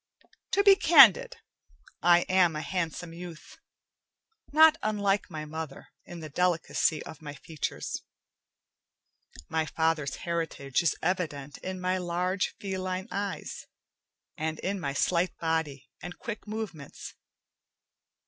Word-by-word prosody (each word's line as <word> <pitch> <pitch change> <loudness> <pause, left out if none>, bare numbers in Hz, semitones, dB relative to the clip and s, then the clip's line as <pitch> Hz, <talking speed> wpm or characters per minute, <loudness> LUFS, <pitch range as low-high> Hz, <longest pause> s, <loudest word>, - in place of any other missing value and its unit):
To 400 - +4
be 400 -1 +8
candid, 480 +8 +7 0.7
I 175 0 +6
am 180 -3 +3
a 155 - -3
handsome 170 -2 -3
youth, 170 -2 -10 0.9
not 315 +1 +7
unlike 205 -2 0
my 155 -3 -6
mother 155 -2 -7 0.2
in 175 -1 -9
the 155 - -6
delicacy 165 -1 +1
of 160 -2 -11
my 145 -1 -7
features. 155 0 -5 1.5
My 160 0 -1
father's 160 -3 0
heritage 165 -5 -2
is 170 - +1
evident 150 -6 -2
in 185 0 -5
my 185 +1 0
large, 180 +2 -1
feline 190 +1 -4
eyes, 200 0 -4 0.7
and 160 -1 -3
in 195 +1 -2
my 140 -5 -3
slight 175 +4 +1
body 160 -4 -2
and 175 0 -8
quick 225 -2 -7
movements. 210 -10 -6
175 Hz, 120 wpm, -28 LUFS, 160-190 Hz, 1.5 s, be